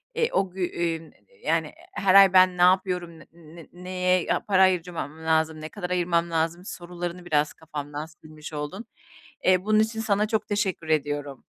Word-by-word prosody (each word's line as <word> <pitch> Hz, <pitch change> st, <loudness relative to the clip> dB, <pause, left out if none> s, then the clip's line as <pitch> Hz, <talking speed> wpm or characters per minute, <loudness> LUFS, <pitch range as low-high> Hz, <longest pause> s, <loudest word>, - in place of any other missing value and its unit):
eee, 465 Hz, -, +1 dB
o 190 Hz, -2 st, +1 dB
gü 190 Hz, +1 st, -7 dB
eee, 170 Hz, -1 st, -1 dB
ün, 160 Hz, 0 st, -15 dB, 0.3 s
yani, -, -, 0 dB, 0.2 s
her 195 Hz, -, +2 dB
ay 195 Hz, -1 st, +8 dB
ben 185 Hz, -1 st, +5 dB
ne -, -, 0 dB
yapıyorum, 180 Hz, -2 st, +2 dB
ne -, -, -15 dB
ne 165 Hz, -1 st, -14 dB
neye 180 Hz, 0 st, 0 dB
ya -, -, +1 dB
para 190 Hz, -2 st, +4 dB
harcamam 170 Hz, -4 st, -1 dB
lazım, 160 Hz, -1 st, +1 dB
ne 155 Hz, -, -6 dB
kadar 180 Hz, -2 st, -6 dB
ayırmam 170 Hz, -1 st, 0 dB
lazım 165 Hz, +2 st, -1 dB
sorularını 175 Hz, -1 st, -6 dB
biraz 150 Hz, -3 st, +1 dB
kafamdan 150 Hz, -1 st, -7 dB
silmiş 155 Hz, -1 st, -13 dB
oldun. 150 Hz, +9 st, -5 dB, 0.6 s
Eee, 185 Hz, 0 st, +3 dB
bunun 215 Hz, 0 st, +3 dB
için 220 Hz, +1 st, 0 dB
sana 210 Hz, -2 st, +1 dB
çok 220 Hz, -1 st, -1 dB
teşekkür 195 Hz, -6 st, -2 dB
ediyorum. 145 Hz, -3 st, -2 dB
175 Hz, 175 wpm, -25 LUFS, 160-185 Hz, 0.6 s, ay